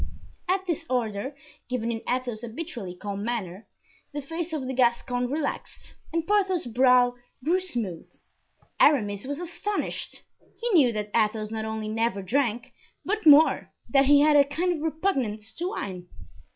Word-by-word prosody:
At 380 +1 +1
this 335 -3 -2
order, 240 +1 -1 0.3
given 235 -2 -1
in 225 -1 -4
Athos's 245 -3 -2
habitually 235 - -6
calm 200 +1 -5
manner, 215 -4 -4 0.5
the 290 - -3
face 330 +4 -4
of 300 -5 -3
the 260 - -3
Gascon 245 0 +1
relaxed 290 +1 -4 0.2
and 330 0 -1
Porthos's 380 - +1
brow 250 0 +5 0.3
grew 345 +6 +2
smooth. 235 - -4 0.7
Aramis 205 -8 +3
was 285 +2 -3
astonished. 355 +4 -4 0.4
He 480 - -1
knew 290 - +5
that 210 -1 -4
Athos 215 -1 +1
not 220 -1 -3
only 220 -1 -4
never 220 -2 -1
drank, 240 +2 -1 0.3
but 425 -2 -1
more, 300 +2 +6 0.2
that 275 -1 +4
he 285 +1 +6
had 300 0 +5
a 285 - +8
kind 335 +6 -1
of 315 - -5
repugnance 270 - -1
to 350 +2 -1
wine. 180 - -5
255 Hz, 150 wpm, -26 LUFS, 220-315 Hz, 0.7 s, a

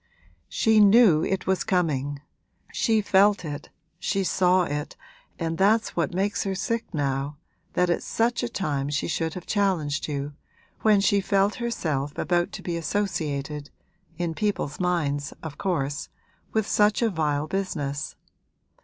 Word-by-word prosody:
'She 220 -1 +3
knew 205 -6 +6
it 190 -1 -1
was 190 -1 +1
coming 145 -6 0 0.5
she 220 -1 +2
felt 200 -1 +4
it, 145 -1 -6 0.3
she 195 +1 0
saw 185 0 +3
it, 150 -2 -4 0.4
and 165 0 -3
that's 220 +4 +3
what 170 -4 0
makes 195 +3 0
her 195 -1 -2
sick 230 +4 -2
now, 140 -2 -2 0.4
that 180 - +2
at 175 - +1
such 235 +1 0
a 240 - -2
time 145 -11 -2
she 145 0 -1
should 165 -1 -2
have 180 - -7
challenged 175 -8 0
you, 145 -1 -3 0.5
when 215 -2 +4
she 200 0 +3
felt 195 +1 +2
herself 150 -12 -2
about 175 -1 +1
to - - -8
be 175 - -2
associated 150 -6 -2 0.5
(in 170 -1 -1
people's 205 -7 -2
minds, 150 -6 0
of 150 -3 -7
course) 155 -6 -2 0.4
with 220 -2 +1
such 210 +3 +3
a 230 - +3
vile 150 -3 0
business. 155 -6 -3
175 Hz, 145 wpm, -25 LUFS, 145-200 Hz, 0.5 s, knew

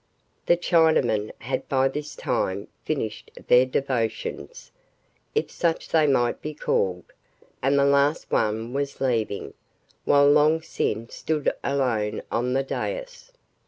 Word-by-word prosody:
The 175 - +5
Chinamen 160 - +2
had 125 +3 -3
by 135 -1 +3
this 150 +2 -5
time 95 +1 -2 0.2
finished 110 -8 -3 0.2
their 125 +1 +6
devotions, 130 - -3 0.6
if 445 - 0
such 165 -2 -1
they 155 -2 +3
might 120 -4 +1
be 155 0 -5
called, 90 -10 -1 0.6
and 140 +2 +2
the 140 - +4
last 140 +2 +2
one 110 +3 0
was 140 0 -3
leaving, 115 -6 -1 0.5
while 140 0 +5
Long 150 +2 +5
Sin 115 -8 -2
stood 155 -3 -1
alone 125 -7 0
on 125 +2 0
the 135 +1 +1
dais. - - -5
135 Hz, 125 wpm, -25 LUFS, 115-150 Hz, 0.6 s, their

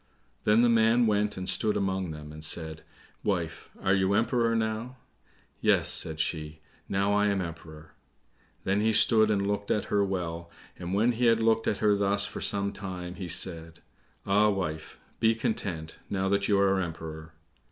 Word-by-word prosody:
Then 110 +3 +4
the - - +5
man 115 +1 +4
went 105 -1 +1
and 95 0 -5
stood 105 +3 +1
among 95 -2 -1
them, 75 -1 -8
and 75 0 -10
said, 80 0 0 0.4
"Wife, 85 -5 -3
are 95 - +2
you 95 0 +2
Emperor 115 +1 +1
now?" 110 +3 -3 0.6
"Yes," - - +3
said 80 -1 +3
she, 75 -1 -3 0.3
"now 100 +1 +1
I 105 0 +3
am 100 -1 0
Emperor." 80 -3 -8 0.7
Then 100 +2 +1
he 110 +1 +2
stood 110 0 +5
and 100 -2 +1
looked 100 0 -2
at 105 - 0
her 100 -1 +3
well, 85 -3 -4 0.3
and 90 +1 -4
when 115 +4 +3
he 120 +1 -1
had 115 -1 +4
looked 115 0 +2
at 105 - +1
her 105 -1 +5
thus 100 0 +1
for - - -7
some 100 0 0
time, 90 -2 -6
he 90 -1 -7
said, 85 -1 -2 0.4
"Ah, 105 +2 +3
wife, 90 -6 -4 0.2
be 115 0 +3
content, 90 -8 -4
now 95 -1 -1
that 100 0 +1
you 100 -2 +3
are 95 -1 +3
Emperor." 80 -2 -7
100 Hz, 175 wpm, -28 LUFS, 85-105 Hz, 0.7 s, the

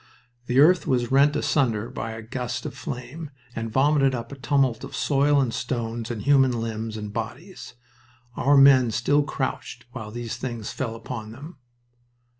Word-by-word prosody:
The 125 +2 +2
earth 170 +5 +5
was 120 -2 0
rent 140 +2 +4
asunder 115 -7 +1
by 115 - -5
a 115 0 -8
gust 120 0 -4
of - - -4
flame, 145 +5 -7 0.3
and 115 0 -3
vomited 135 +1 +3
up 115 -1 -6
a - - -6
tumult 135 -3 +1
of 135 - -7
soil 145 0 +2
and 125 -4 0
stones 115 -2 -3
and 115 -4 -4
human 135 -4 +4
limbs 110 -1 -4
and 105 -1 -6
bodies. 120 - -7 0.6
Our 140 +2 +3
men 135 -3 +7
still 125 +6 +2
crouched 130 -4 -4
while 115 -5 -7
these 120 +1 -5
things 120 -3 -5
fell 115 -4 -4
upon 110 -1 -7
them. 145 +6 -11
125 Hz, 165 wpm, -24 LUFS, 115-140 Hz, 0.6 s, men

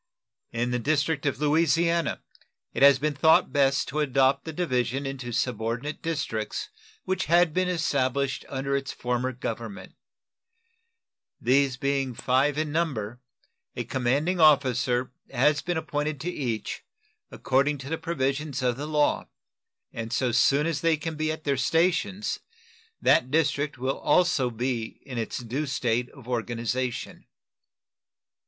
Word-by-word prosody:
In 120 +1 -1
the 125 - 0
district 150 +2 0
of 135 -2 -1
Louisiana 165 +2 +2 0.5
it - - -3
has 140 -1 +8
been 150 +2 -1
thought 160 +3 +4
best 140 -1 +2
to 150 - -2
adopt 135 -1 +2
the 160 - -4
division 135 -5 -1
into 135 -3 -5
subordinate 120 +4 -2
districts 140 -10 -3 0.4
which 190 0 -1
had 170 0 +4
been 185 +1 +1
established 140 -5 0
under 135 0 -2
its 135 -1 -2
former 125 +1 -2
government. 115 -4 -6 1.5
These 130 +1 +2
being 135 -2 -1
five 130 +4 +1
in 155 -1 -1
number, 125 -9 -2 0.6
a - - -2
commanding 140 +8 0
officer 130 -5 +3 0.2
has 145 +3 +2
been 175 -1 -2
appointed 150 -2 -2
to 180 - -2
each, 120 -9 -3 0.5
according 140 +3 +1
to 135 +1 -8
the 160 - -2
provisions 140 -3 -2
of 125 -1 +1
the 145 +2 -4
law, 150 -1 +1 0.7
and 115 0 -5
so 125 0 +1
soon 140 +5 +3
as 165 -3 -1
they 165 -1 +3
can 160 +1 -4
be 155 0 -1
at 155 0 -6
their 140 -2 0
stations 180 +8 +1 0.6
that 125 - +3
district 145 -1 +1
will 130 +2 -2
also 170 -8 +3
be 120 -1 -3
in 130 -4 -5
its 115 - -3
due 130 +5 -3
state 125 -2 0
of 135 -4 -15
organization. 120 +1 -3
140 Hz, 140 wpm, -26 LUFS, 125-155 Hz, 1.5 s, has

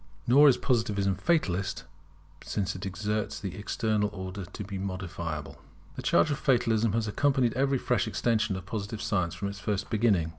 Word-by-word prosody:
[Nor 140 +4 +7
is 125 - +4
Positivism 105 -6 +1
fatalist, 95 - 0 0.6
since 100 -2 -2
it 95 - -7
asserts 105 +3 -2
the 95 -3 -5
External 105 0 0
Order 95 -1 -6
to 105 - -7
be 100 -1 -5
modifiable] 85 -7 -5 0.3
The - - -5
charge 155 - +3
of 145 - -1
Fatalism 115 -4 +2
has 115 -1 0
accompanied 130 +1 +2
every 135 +1 +2
fresh 125 0 0
extension 110 -4 +1
of 95 -1 -6
Positive 105 +2 -4
science, 90 -6 0
from 100 - -3
its 100 0 -8
first 100 +1 -2
beginnings. 105 -7 +2
105 Hz, 165 wpm, -28 LUFS, 95-115 Hz, 0.6 s, Nor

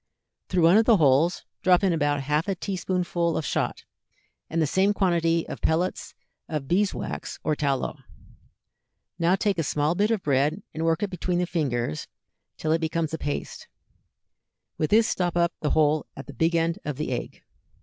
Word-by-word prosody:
Through 180 -2 +1
one 170 +5 +7
of 225 - +4
the 230 -3 +6
holes 155 +3 +3 0.2
drop 180 +1 +4
in 190 -3 +3
about 145 -3 +1
half 150 +5 0
a 195 - 0
tea 195 +2 -4
spoonful 175 -2 -1
of 155 - -2
shot - - -2 0.7
and 165 - -1
the 160 - +3
same 190 +7 +2
quantity 170 -3 +1
of - - -7
pellets 175 +4 -1 0.3
of 150 -4 -3
bees 195 +5 +2
wax - - -5
or 155 - +1
tallow. 140 -3 -1 1.2
Now 170 +2 +3
take 195 -3 0
a - - +1
small 150 +2 0
bit 205 +4 +1
of 225 -4 0
bread 145 +7 +1
and 160 +1 -2
work 165 +3 +1
it 200 - -2
between 180 0 -2
the 180 - +1
fingers 130 - -2 0.5
till 155 - -1
it 165 +1 +2
becomes 160 0 -1
a 160 - -3
paste; 145 - -4 1.1
with 155 - -1
this 220 +1 +5
stop 175 -4 -1
up 170 0 +2
the 150 - -1
hole 155 0 +2
at 135 - -7
the 140 - -10
big 165 +3 +1
end 165 0 +1
of 150 -3 -4
the 150 - -3
egg. 120 - -5
165 Hz, 190 wpm, -25 LUFS, 150-180 Hz, 1.2 s, one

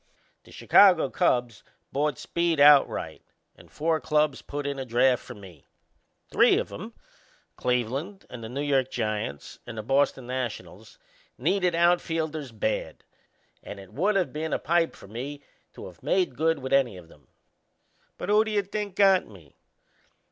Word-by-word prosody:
The - - -17
Chicago 180 -9 +5
Cubs 120 -3 0 0.3
bought 145 -1 -1
Speed 170 -2 -1
outright 145 -1 +4 0.3
and - - -18
four 160 +1 0
clubs 150 -2 +1
put 145 0 -6
in 140 -1 -3
a - - -3
draft 125 +1 +2
for - - -10
me. 95 -8 -15 0.6
Three - - +5
of - - -3
'em - - -8 0.6
Cleveland 130 - -2
and 120 -2 -10
the 110 - -7
New 140 +4 -4
York 135 -3 +1
Giants 105 - -4
and 115 -2 -8
the 110 - -4
Boston 135 +1 +1
Nationals 130 - -6 0.4
needed 180 -3 +1
outfielders 165 -4 0
bad, 110 0 -3 0.6
and 100 - -9
it 95 -1 -14
would 195 +7 +1
of 185 - -1
been 155 +1 -3
a - - +2
pipe 165 +2 0
for - - -14
me 135 +7 -7 0.3
to - - -10
of 90 -3 -13
made 180 -9 0
good 160 +3 +1
with 130 -1 -5
any 125 -8 +2
of 85 -2 -14
'em. 75 - -21 0.9
But 180 - -6
who 210 +1 +5
do 220 - -5
you 205 -2 0
think 200 0 -5
got 195 -2 +4
me? 85 -9 -17
140 Hz, 160 wpm, -26 LUFS, 120-170 Hz, 0.9 s, Chicago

